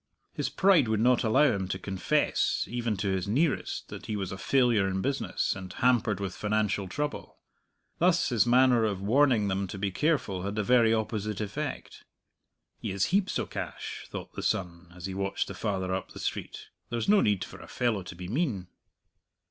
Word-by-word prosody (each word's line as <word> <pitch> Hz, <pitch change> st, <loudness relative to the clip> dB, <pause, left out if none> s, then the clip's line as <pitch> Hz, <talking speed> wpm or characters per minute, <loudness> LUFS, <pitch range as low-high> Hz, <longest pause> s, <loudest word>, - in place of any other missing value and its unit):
His -, -, -2 dB
pride 185 Hz, -9 st, +4 dB
would 110 Hz, -1 st, +1 dB
not 125 Hz, +2 st, +4 dB
allow 110 Hz, +6 st, +4 dB
him 95 Hz, -2 st, -2 dB
to -, -, -2 dB
confess, 95 Hz, -2 st, 0 dB
even 120 Hz, -3 st, -2 dB
to 100 Hz, +1 st, -1 dB
his 95 Hz, +1 st, -1 dB
nearest, 140 Hz, +8 st, 0 dB
that -, -, -8 dB
he 105 Hz, -, -2 dB
was 95 Hz, -3 st, -3 dB
a 95 Hz, -, -5 dB
failure 120 Hz, -5 st, +3 dB
in 95 Hz, 0 st, -1 dB
business, 135 Hz, +7 st, -1 dB
and 95 Hz, -1 st, -7 dB
hampered 120 Hz, -5 st, +2 dB
with 95 Hz, -2 st, -3 dB
financial 105 Hz, -2 st, 0 dB
trouble. 145 Hz, +10 st, -4 dB, 0.6 s
Thus 175 Hz, +1 st, +3 dB
his 120 Hz, -2 st, +2 dB
manner 125 Hz, -1 st, +5 dB
of 105 Hz, -4 st, 0 dB
warning 115 Hz, +1 st, +3 dB
them 95 Hz, 0 st, -1 dB
to 95 Hz, -, -7 dB
be 100 Hz, 0 st, -1 dB
careful 130 Hz, -, 0 dB
had 100 Hz, +2 st, -3 dB
the 105 Hz, -, 0 dB
very 120 Hz, 0 st, +4 dB
opposite 110 Hz, -2 st, -1 dB
effect. 130 Hz, +8 st, -5 dB, 0.8 s
"He -, -, -4 dB
has 95 Hz, -1 st, +1 dB
heaps 195 Hz, -1 st, +2 dB
o' -, -, -1 dB
cash," -, -, -6 dB
thought -, -, -7 dB
the -, -, -5 dB
son, 85 Hz, -1 st, -2 dB
as 90 Hz, -1 st, -8 dB
he 95 Hz, -, -4 dB
watched 95 Hz, 0 st, -2 dB
the -, -, -6 dB
father 95 Hz, -3 st, -2 dB
up 95 Hz, -, -4 dB
the -, -, -9 dB
street; -, -, -5 dB, 0.2 s
"there's 115 Hz, -1 st, -2 dB
no 205 Hz, 0 st, +6 dB
need 100 Hz, -3 st, +2 dB
for -, -, -10 dB
a -, -, -11 dB
fellow 115 Hz, -5 st, 0 dB
to 85 Hz, -1 st, -9 dB
be 90 Hz, +1 st, -7 dB
mean." 110 Hz, -, -1 dB
105 Hz, 195 wpm, -28 LUFS, 95-125 Hz, 0.8 s, no